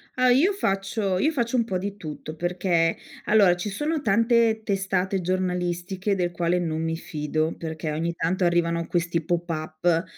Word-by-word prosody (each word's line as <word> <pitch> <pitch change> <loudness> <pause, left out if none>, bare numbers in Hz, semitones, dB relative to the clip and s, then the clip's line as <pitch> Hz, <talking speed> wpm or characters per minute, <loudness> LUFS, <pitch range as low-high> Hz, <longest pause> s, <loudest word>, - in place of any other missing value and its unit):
Ah, 255 0 +3
io 310 +11 +4
faccio 195 - -1
io 310 +9 +2
faccio 240 -4 -1
un 235 - +3
po' 190 -5 -2
di 200 +2 -4
tutto, 155 -3 -7
perché 175 -1 +1 0.3
allora 200 -5 +5
ci 190 +4 -4
sono 300 +8 -2
tante 230 0 +3
testate 195 -1 0
giornalistiche 185 +2 -1
del 175 -2 -1
quale 175 +1 0
non 160 -2 -2
mi 165 0 -1
fido. 155 0 -2
Perché 160 -1 -4
ogni 165 +3 -1
tanto 180 +3 -1
arrivano 170 -1 +1
questi 170 -1 0
pop-up 165 0 -1
180 Hz, 160 wpm, -25 LUFS, 170-200 Hz, 0.3 s, allora